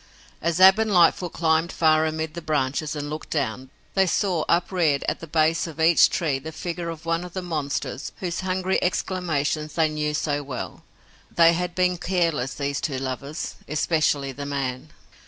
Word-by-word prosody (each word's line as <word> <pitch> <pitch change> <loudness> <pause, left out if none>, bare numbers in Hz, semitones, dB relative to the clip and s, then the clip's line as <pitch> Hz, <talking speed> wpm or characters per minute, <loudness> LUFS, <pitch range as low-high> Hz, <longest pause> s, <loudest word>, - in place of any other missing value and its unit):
As 170 +1 0
Ab 190 +3 +8
and 220 -1 +1
Lightfoot 175 -1 +4
climbed 160 0 +1
far 155 -1 +3
amid 160 0 -3
the 170 - -6
branches 150 0 -1
and 145 0 -4
looked 155 +1 -6
down, 130 -3 -2 0.2
they 190 -1 +3
saw 180 -2 0
upreared 170 -4 +2
at - - -1
the 165 - -9
base 160 +2 +2
of 160 -1 -10
each 165 +1 +6
tree 150 -6 -1
the 160 +4 -7
figure 170 +1 -4
of 165 0 -8
one 165 +1 0
of 180 -1 -9
the 185 - -3
monsters 150 -4 -3
whose 175 -2 -3
hungry 185 0 0
exclamations 155 -5 -1
they 160 -2 +3
knew 150 0 -2
so 145 -1 -1
well. 135 -3 -6 0.5
They 170 0 +5
had 180 +1 -2
been 180 -1 +1
careless, 165 -9 0
these 140 -1 -2
two 135 -4 -2
lovers, 135 +4 -4
especially 150 -2 +1
the 140 +2 -6
man. 135 0 -3
160 Hz, 175 wpm, -24 LUFS, 145-175 Hz, 0.5 s, Ab